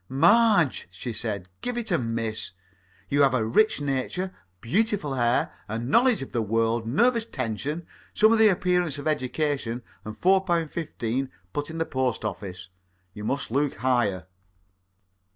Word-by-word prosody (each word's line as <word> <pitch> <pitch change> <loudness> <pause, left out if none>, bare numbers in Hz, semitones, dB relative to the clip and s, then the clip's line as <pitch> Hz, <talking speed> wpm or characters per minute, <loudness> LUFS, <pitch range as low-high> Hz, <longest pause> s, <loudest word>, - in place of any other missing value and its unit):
"Marge," 175 - +4
she 105 +6 -6
said, 105 -5 -3
"give 245 -1 -3
it 230 -3 -2
a 170 - +3
miss. 115 -3 -3 0.5
You 145 +1 +2
have 135 -2 +4
a 115 -3 +1
rich 215 - +3
nature, 145 +7 -2 0.3
beautiful 185 - 0
hair, 120 -1 +1
a 110 - -3
knowledge 220 - +3
of - - -10
the 115 - 0
world, 115 +1 0
nervous 230 - +3
tension, 135 - -4 0.3
some 215 +1 +4
of 225 - +3
the 220 - +7
appearance 180 -5 +1
of 145 - -5
education, 135 -4 -1 0.2
and 110 0 -8
four 190 +1 +4
pound 170 -4 0
fifteen 130 -5 -3 0.2
put 145 0 -2
by 160 - -6
in - - -6
the 165 - 0
Post 130 -6 -1
Office. 90 -3 -6 0.4
You 105 - -8
must 135 +2 -2
look 140 +3 +1
higher." 120 -7 0
135 Hz, 160 wpm, -26 LUFS, 115-175 Hz, 0.5 s, the